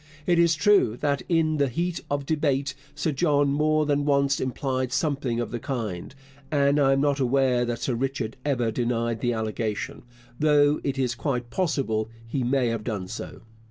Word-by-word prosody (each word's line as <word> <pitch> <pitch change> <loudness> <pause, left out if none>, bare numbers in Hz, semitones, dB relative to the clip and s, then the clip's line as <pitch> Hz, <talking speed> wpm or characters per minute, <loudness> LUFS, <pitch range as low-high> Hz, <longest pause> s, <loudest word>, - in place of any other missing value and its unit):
It 175 -1 +3
is 170 -1 +4
true 195 - +3
that 140 -1 +1
in 160 -2 +2
the 140 -1 +2
heat 170 +7 -2
of 145 -1 -1
debate 140 -3 0 0.2
Sir 160 - -1
John 145 -1 +2
more 155 +2 +2
than 145 -1 +1
once 140 -1 +2
implied 130 0 -2
something 135 -4 -1
of 120 - -3
the 120 - -3
kind, 115 -4 -4 0.4
and 140 0 +3
I 135 -1 +4
am 135 - +2
not 145 -1 +1
aware 130 -1 +2
that 120 -1 -3
Sir 130 - -1
Richard 130 -2 -2
ever 125 -6 0
denied 115 -1 -1
the 120 -1 +1
allegation, 110 -1 -3 0.4
though 150 -1 +4
it 135 -1 -2
is 125 -2 0
quite 120 -2 -3
possible 135 - -1 0.2
he 130 +3 -2
may 125 0 +1
have 115 -2 -3
done 105 -6 -3
so. 110 - -7
135 Hz, 180 wpm, -25 LUFS, 120-145 Hz, 0.4 s, is